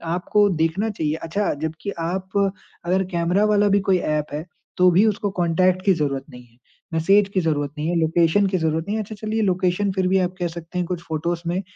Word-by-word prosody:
आपको 205 +3 +2
देखना 185 +7 0
चाहिए 155 -7 -2
अच्छा 195 +5 -1
जब्कि 160 +5 -4
आप 185 +3 -3 0.6
अगर 185 +2 +2
कैमरा 175 +4 +1
वाला 210 -1 +3
भी - - +4
कोई 185 - +5
ऐप 150 -3 -1
है 150 +2 -4 0.3
तो 180 0 +6
भी 190 +5 +4
उसको 215 -1 0
कॉन्टैक्ट 180 +2 +2
की 195 - +5
ज़रूरत 140 -5 -1
नहीं 125 -2 -12
है, 115 0 -28 0.4
मैसेज 195 +5 +3
की 190 - +2
ज़रूरत 145 -3 -1
नहीं 150 +2 -2
है, 175 - 0
लोकेशन 165 +4 +3
की 185 - 0
ज़रूरत 160 0 -1
नहीं 210 - -1
है। - - -1
अच्छा 215 +2 -9
चलिए 215 +1 -2
लोकेशन 185 0 +1
फिर 190 -1 0
भी 190 +1 +3
आप 180 0 -1
कह 175 - 0
सकते 170 +1 -8
हैं 180 - 0
कुछ 180 -2 -3
फ़ोटोज़ 165 +2 -2
में 180 +3 -1
180 Hz, 220 wpm, -22 LUFS, 160-195 Hz, 0.6 s, तो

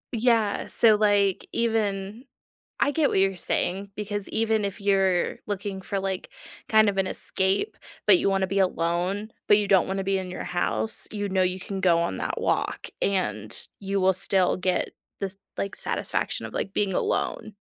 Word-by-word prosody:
Yeah, 225 -3 +2
so, 220 -2 +5
like, 205 -2 +2
even 215 0 -1 0.6
I 285 - +3
get 310 -2 +2
what - - +1
you're 195 0 +2
saying 195 +2 -1
because 205 -1 -3
even 220 -1 +1
if 200 +2 -4
you're 195 -3 +2
looking 200 -1 -4
for, 195 +1 -2
like, 190 -1 -4 0.4
kind 220 -1 +5
of 200 - 0
an 190 -1 +1
escape, 190 - +1 0.3
but 360 - +7
you 200 - +1
wanna 195 -1 +1
be 195 +1 -1
alone, 185 +3 0 0.2
but 205 - +7
you 205 -2 -1
don't 190 -3 +4
wanna 195 +1 -2
be 195 0 0
in 185 -1 -5
your 185 - -5
house, 110 -11 -1
you 205 -1 -2
know 190 -1 +2
you 185 0 -1
can 195 0 -5
go 175 -3 +4
on 170 0 -1
that - - -3
walk - - -1
and 110 - -1
you 195 0 -1
will 190 0 +4
still 185 0 +3
get 185 0 0 0.3
this, 195 -1 -3 0.2
like, 200 - -3
satisfaction - - -2
of, - - -11
like, 195 - -3
being 195 -3 0
alone. 215 - -1
195 Hz, 180 wpm, -26 LUFS, 185-205 Hz, 0.6 s, but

